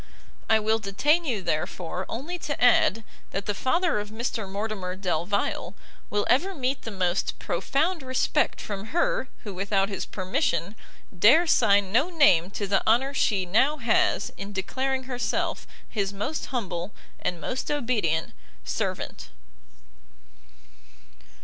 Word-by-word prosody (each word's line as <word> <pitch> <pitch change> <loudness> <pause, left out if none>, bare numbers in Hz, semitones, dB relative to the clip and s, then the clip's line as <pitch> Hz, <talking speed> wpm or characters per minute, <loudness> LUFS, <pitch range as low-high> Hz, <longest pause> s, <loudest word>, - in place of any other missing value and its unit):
I 220 - +6
will 220 +1 +1
detain 290 - +2
you, 225 -9 -1
therefore, 175 +2 -2
only 315 +10 -4
to 290 -3 -4
add, 230 -3 +4 0.3
that 195 - -4
the 205 - 0
father 330 - +1
of 205 0 -5
Mr 220 -2 -3
Mortimer 200 -3 -3
Delvile, 185 +1 -1 0.3
will 205 0 0
ever 370 +10 +2
meet 265 0 -1
the - - -6
most 185 -2 -1
profound 325 +4 0
respect 260 -1 +1
from 200 -1 -5
her - - +1 0.2
who, 205 -4 -6
without 195 +1 0
his 195 - -4
permission, 190 - -1 0.4
dare 235 - +6
sign 200 - +4
no 260 - +3
name 235 - +4
to 200 +1 -3
the 195 0 +2
honour 255 +5 +3
she 200 -8 +1
now 260 +12 +3
has 235 -4 +2
in 200 +1 -6
declaring 260 +7 -2
herself 250 -1 -2 0.2
his 200 -3 -2
most 210 +11 -3
humble, 190 -7 -3 0.3
and 175 - -2
most 255 +9 -3
obedient 225 - 0 0.3
servant. - - -3
215 Hz, 135 wpm, -26 LUFS, 195-265 Hz, 0.4 s, I